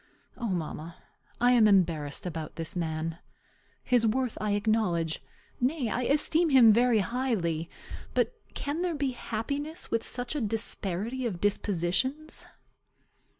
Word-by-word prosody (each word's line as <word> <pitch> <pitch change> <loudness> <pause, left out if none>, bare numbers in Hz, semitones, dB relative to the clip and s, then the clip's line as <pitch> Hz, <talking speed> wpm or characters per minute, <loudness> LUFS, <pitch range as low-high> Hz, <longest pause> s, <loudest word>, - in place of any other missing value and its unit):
O 235 - -3
mamma, 165 -2 -4 0.4
I 245 +1 +5
am 235 -3 +6
embarrassed 165 -8 +2
about 160 -3 -5
this 165 +1 -4
man. 165 -1 -2 0.6
His 245 -2 +3
worth 250 +1 0
I 210 -1 0
acknowledge; 205 -7 +1 0.4
nay, 255 -1 0
I 245 +3 -1
esteem 315 +4 +4
him 245 -6 +8
very 235 -1 +4
highly. 190 -9 -1 0.5
But - - +2 0.2
can 290 +4 -2
there 355 -2 0
be 280 -2 0
happiness 280 +8 -4
with 230 -1 +1
such 245 +1 -3
a 295 - -1
disparity 225 +2 -2
of 185 -6 -4
dispositions? 205 - 0
225 Hz, 130 wpm, -29 LUFS, 175-255 Hz, 0.6 s, him